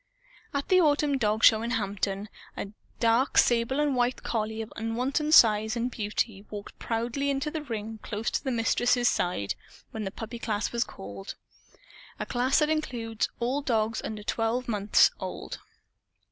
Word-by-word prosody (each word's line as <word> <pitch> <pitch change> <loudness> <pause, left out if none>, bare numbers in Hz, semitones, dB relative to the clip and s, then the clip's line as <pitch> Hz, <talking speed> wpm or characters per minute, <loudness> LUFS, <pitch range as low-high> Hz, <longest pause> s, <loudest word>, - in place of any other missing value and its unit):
At 280 0 -3
the 370 -1 +6
autumn 290 -3 +2
dog 215 -1 +1
show, 220 0 +7
in 230 - -2
Hampton, 200 -3 -2 0.3
a 195 - -4 0.3
"dark 235 +3 +2
sable 240 +3 +3
and 295 -2 +2
white" 245 0 0
collie 220 -1 -2
of 220 - -12
unwonted 250 +7 -1
size 220 0 +6
and 240 +1 -1
beauty 210 -2 -2
walked 205 -1 -8
proudly 240 +5 -1
into 280 +2 -1
the 315 - -3
ring 225 -5 -5
close 220 +1 -3
to - - -1
the 265 - -2
Mistress's 245 +1 +2
side, 175 - 0 0.4
when 220 - -4
the 195 - -2
puppy 225 +3 -7
class 210 -3 -2
was 235 0 +1
called 100 - -9 0.8
a - - -2
class 250 +3 +1
that 300 -1 +3
includes 235 -8 -2
all 250 +4 0
dogs 225 -4 0
under 215 -1 -5
twelve 230 +4 -1
months 210 -2 +4
old. - - -6
230 Hz, 160 wpm, -28 LUFS, 215-255 Hz, 0.8 s, show